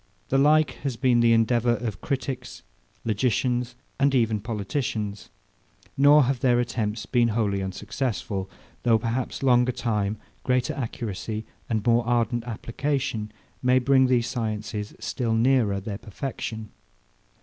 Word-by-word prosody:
The 135 Hz, -, +3 dB
like 155 Hz, +2 st, +4 dB
has 135 Hz, -4 st, -2 dB
been 125 Hz, 0 st, +3 dB
the 120 Hz, 0 st, +5 dB
endeavour 120 Hz, +1 st, +3 dB
of 110 Hz, -5 st, -5 dB
critics, 130 Hz, -3 st, -4 dB, 0.4 s
logicians, 125 Hz, +2 st, 0 dB, 0.2 s
and 140 Hz, 0 st, +3 dB
even 110 Hz, -4 st, +2 dB
politicians: 105 Hz, -1 st, -3 dB, 0.7 s
Nor 145 Hz, +2 st, +6 dB
have 130 Hz, 0 st, 0 dB
their 120 Hz, -1 st, +3 dB
attempts 115 Hz, -2 st, -2 dB
been 120 Hz, -2 st, +2 dB
wholly 105 Hz, -3 st, 0 dB
unsuccessful; 95 Hz, 0 st, -3 dB, 0.3 s
though 115 Hz, -2 st, +4 dB
perhaps 120 Hz, +4 st, -3 dB
longer 125 Hz, -1 st, +4 dB
time, 105 Hz, -4 st, -1 dB, 0.3 s
greater 125 Hz, -1 st, +1 dB
accuracy, 110 Hz, -3 st, -4 dB, 0.2 s
and 110 Hz, -2 st, -1 dB
more 120 Hz, 0 st, +4 dB
ardent 120 Hz, -1 st, +1 dB
application 120 Hz, -1 st, -2 dB, 0.3 s
may 125 Hz, 0 st, +4 dB
bring 130 Hz, +1 st, +4 dB
these 125 Hz, -2 st, +2 dB
sciences 110 Hz, -4 st, -3 dB
still 115 Hz, -3 st, -1 dB
nearer 115 Hz, -4 st, +3 dB
their 100 Hz, +1 st, -5 dB
perfection. 110 Hz, -1 st, -6 dB
120 Hz, 125 wpm, -25 LUFS, 110-130 Hz, 0.7 s, Nor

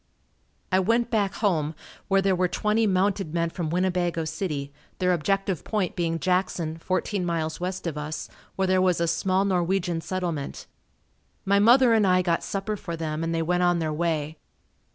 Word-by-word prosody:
I 185 Hz, -, +4 dB
went 230 Hz, +5 st, +1 dB
back 205 Hz, -3 st, +1 dB
home 160 Hz, -7 st, 0 dB, 0.3 s
where 195 Hz, 0 st, +3 dB
there 195 Hz, -1 st, +3 dB
were 180 Hz, 0 st, +2 dB
twenty 215 Hz, +4 st, +1 dB
mounted 190 Hz, -3 st, 0 dB
men 170 Hz, 0 st, 0 dB
from 165 Hz, -3 st, -3 dB
Winnebago 175 Hz, -1 st, 0 dB
City, 150 Hz, -3 st, -4 dB, 0.2 s
their 180 Hz, -1 st, +2 dB
objective 195 Hz, +1 st, 0 dB
point 205 Hz, -5 st, -1 dB
being 165 Hz, -1 st, 0 dB
Jackson, 175 Hz, -3 st, -1 dB
fourteen 185 Hz, +2 st, -1 dB
miles 165 Hz, -2 st, -2 dB
west 185 Hz, +1 st, -4 dB
of 155 Hz, -3 st, -3 dB
us 150 Hz, +1 st, -5 dB, 0.3 s
where 190 Hz, -, +1 dB
there 185 Hz, 0 st, +3 dB
was 180 Hz, -2 st, +2 dB
a 170 Hz, -, +1 dB
small 185 Hz, +3 st, +1 dB
Norwegian 180 Hz, -2 st, 0 dB
settlement. 170 Hz, -6 st, -4 dB, 0.8 s
My 200 Hz, +1 st, +4 dB
mother 240 Hz, +3 st, +6 dB
and 215 Hz, -3 st, +4 dB
I 185 Hz, 0 st, +4 dB
got 170 Hz, -2 st, 0 dB
supper 200 Hz, +2 st, -3 dB
for 170 Hz, -3 st, -5 dB
them 155 Hz, 0 st, -3 dB
and 165 Hz, -, -1 dB
they 165 Hz, 0 st, 0 dB
went 180 Hz, +2 st, +1 dB
on 175 Hz, -1 st, +3 dB
their 160 Hz, -2 st, -1 dB
way. 155 Hz, -1 st, -2 dB
180 Hz, 175 wpm, -25 LUFS, 165-195 Hz, 0.8 s, mother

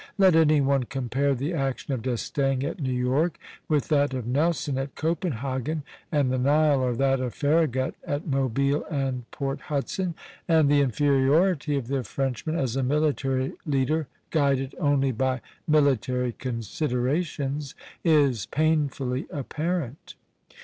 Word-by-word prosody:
Let 190 Hz, -4 st, +5 dB
any 155 Hz, -2 st, +5 dB
one 135 Hz, -2 st, +2 dB
compare 135 Hz, +1 st, 0 dB
the 140 Hz, +7 st, -2 dB
action 135 Hz, -2 st, -2 dB
of 125 Hz, -, -2 dB
D'Estaing 130 Hz, +2 st, -1 dB
at 155 Hz, +5 st, -3 dB
New 135 Hz, -4 st, -1 dB
York 130 Hz, +7 st, +1 dB, 0.3 s
with 150 Hz, -3 st, +1 dB
that 145 Hz, -3 st, +2 dB
of 125 Hz, -3 st, -3 dB
Nelson 140 Hz, +1 st, 0 dB
at 135 Hz, 0 st, -5 dB
Copenhagen 150 Hz, -, -2 dB, 0.3 s
and 145 Hz, -5 st, +2 dB
the 130 Hz, -, 0 dB
Nile, 145 Hz, +1 st, +3 dB
or 125 Hz, -2 st, 0 dB
that 135 Hz, +1 st, +2 dB
of 125 Hz, -2 st, -3 dB
Farragut 145 Hz, -4 st, +1 dB
at 145 Hz, +1 st, -3 dB
Mobile 140 Hz, 0 st, +1 dB
and 135 Hz, -4 st, -3 dB
Port 135 Hz, -1 st, -4 dB
Hudson, 165 Hz, +4 st, -2 dB, 0.3 s
and 160 Hz, -4 st, +4 dB
the 145 Hz, -1 st, +5 dB
inferiority 145 Hz, -, +2 dB
of 135 Hz, -, -3 dB
the 135 Hz, -1 st, -1 dB
Frenchman 135 Hz, +7 st, -2 dB
as 130 Hz, -7 st, -1 dB
a 135 Hz, -, +1 dB
military 135 Hz, -1 st, 0 dB
leader, 150 Hz, +2 st, 0 dB, 0.2 s
guided 140 Hz, -3 st, +1 dB
only 140 Hz, -4 st, +2 dB
by 130 Hz, +2 st, 0 dB, 0.3 s
military 130 Hz, -5 st, +2 dB
considerations, 135 Hz, -, -2 dB, 0.3 s
is 145 Hz, -, +3 dB
painfully 145 Hz, -4 st, 0 dB
apparent. 150 Hz, 0 st, -4 dB
140 Hz, 135 wpm, -26 LUFS, 130-150 Hz, 0.3 s, Let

